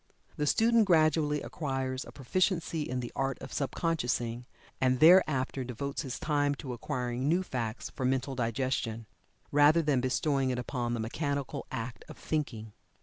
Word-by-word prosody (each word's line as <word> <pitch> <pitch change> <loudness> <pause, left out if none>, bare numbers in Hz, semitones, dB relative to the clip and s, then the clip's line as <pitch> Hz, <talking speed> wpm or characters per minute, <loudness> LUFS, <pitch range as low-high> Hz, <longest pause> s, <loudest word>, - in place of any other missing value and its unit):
The 150 - -1
student 230 +4 +4
gradually 155 -4 +3
acquires 135 -3 -3
a - - -11
proficiency 170 +3 0
in 125 -3 -2
the 120 - -6
art 135 -1 -1
of 135 - -9
sub 140 -3 -2
consciousing, 120 -7 -1 0.3
and 130 -1 +3
thereafter 155 -6 +5
devotes 130 +3 -4
his 130 -5 -5
time 145 -2 +1
to 130 -2 -6
acquiring 125 +2 -2
new 175 +3 +2
facts 120 -8 -4
for 135 - -5
mental 130 +1 0
digestion, 115 -2 -2 0.5
rather 145 +3 +5
than 145 -4 +2
bestowing 135 +1 +1
it 125 - -1
upon 120 -1 -2
the - - -4
mechanical 140 +4 -3
act 115 +1 -5
of - - -10
thinking. 115 -9 -3
135 Hz, 155 wpm, -30 LUFS, 125-150 Hz, 0.5 s, thereafter